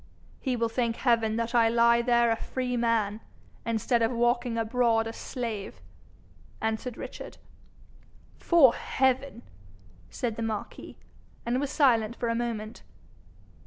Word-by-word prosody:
'He 260 -3 -1
will 230 -1 0
thank 230 0 -1
heaven 230 -4 +1
that 230 +1 -2
I 230 -2 +4
lie 235 0 +4
there 235 -1 +3
a - - +2
free 250 +2 -3
man 225 -3 0 0.5
instead 230 +1 +1
of 225 +1 +2
walking 240 0 0
abroad 225 0 +1
a 225 - -5
slave,' 225 -5 -5 0.8
answered 220 +2 -3
Richard. - - -8 1.0
''Fore 300 -9 +5
heaven!' 265 -1 -1 0.7
said 230 -3 -3
the - - -4
marquis, 220 -2 -5 0.5
and 240 +2 0
was 285 - -2
silent 235 -6 +2
for 235 - -2
a - - +1
moment. 230 -2 -4
235 Hz, 130 wpm, -27 LUFS, 225-245 Hz, 1.0 s, Fore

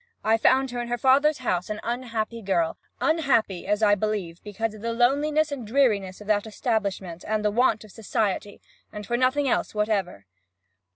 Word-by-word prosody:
I 220 +1 +4
found 265 +2 +3
her 245 0 -3
in 240 - -5
her 240 0 -1
father's 275 +5 +4
house 180 -8 -2
an 210 0 -3
unhappy 230 -2 -3
girl 175 -5 0 0.2
unhappy, 265 - +1
as 210 +2 +1
I 205 -1 +5
believe, 205 -5 -2
because 210 +1 -3
of 215 - -12
the 230 +1 -2
loneliness 290 +6 +2
and 275 -4 -4
dreariness 210 -7 +1
of 210 - -11
that 210 0 +1
establishment, 200 -6 -2
and 215 0 -1
the 210 - +3
want 225 -1 +2
of 215 - -14
society, 205 -2 -2 0.3
and 210 -1 -7
for 240 - -1
nothing 260 +3 +2
else 245 - 0
whatever. 200 - -1
220 Hz, 180 wpm, -25 LUFS, 205-250 Hz, 0.3 s, I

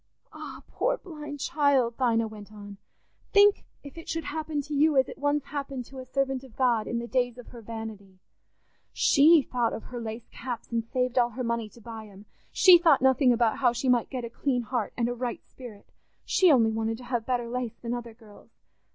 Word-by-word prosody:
"Ah, - - -9
poor - - -1
blind 300 -7 -9
child!" 270 -5 +2
Dinah 230 -3 +2
went 210 -1 -11
on, 205 -1 -11 0.6
"think 405 0 +5 0.2
if 285 +3 -10
it 330 - -11
should 325 0 -2
happen 310 0 -3
to 300 - -7
you 295 0 +3
as 260 - +4
it - - -10
once 290 0 +1
happened 275 -3 -5
to 270 +2 -11
a 255 - -8
servant 270 0 -1
of 260 -4 -15
God 240 -4 +1
in 235 - -2
the 235 - -3
days 245 -1 -1
of 245 - -11
her 235 - -11
vanity. 215 -4 -8 0.7
She 305 +2 +5
thought 240 -3 -1
of 225 - -6
her 245 -1 -7
lace 225 +1 -6
caps 240 -2 -7
and 230 -1 0
saved 250 +2 -1
all 240 -1 +3
her 250 +2 -5
money 230 -2 -2
to 235 - -18
buy 225 -1 -9
'em; 200 0 -15 0.3
she 370 -2 +7
thought 320 -6 +4
nothing 265 0 +4
about 235 -2 +2
how 245 -3 +3
she 250 +2 -3
might 245 -2 +2
get 255 -3 -4
a - - -6
clean 250 -1 -1
heart 235 -2 -2
and 235 -1 +1
a 245 - -2
right 245 0 -5
spirit—she 250 - -2
only 230 -5 +4
wanted 225 0 -2
to 250 - -12
have 240 -2 -3
better 245 -2 -1
lace 240 -1 -4
than 235 0 -4
other 235 -2 -6
girls. 220 -3 -17
245 Hz, 210 wpm, -27 LUFS, 230-275 Hz, 0.7 s, she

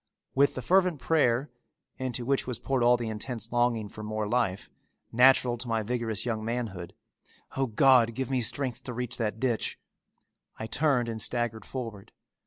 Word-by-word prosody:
With 140 +1 +3
the 130 - -5
fervent 180 -4 +3
prayer, 135 -3 +1 0.5
into 125 -2 -3
which 135 0 0
was 125 - -2
poured 135 -2 -1
all 120 +1 +5
the 120 -1 -4
intense 115 +1 -3
longing 120 -3 +1
for 110 - -10
more 110 0 -3
life, 105 -5 0 0.4
natural 125 0 +4
to 120 - -4
my 115 -1 0
vigorous 115 -1 -2
young 110 -3 -2
manhood, 110 -7 -4 0.6
"O, 135 0 0
God, 115 0 +4
give 135 +1 -3
me 130 -2 +1
strength 125 +1 -1
to 125 - -5
reach 125 0 -3
that 110 -1 -2
ditch," 120 -3 -1 0.8
I 110 - -5
turned 125 +1 +1
and 110 -1 -3
staggered 120 -2 -1
forward. 115 -6 -7
120 Hz, 170 wpm, -28 LUFS, 110-130 Hz, 0.8 s, all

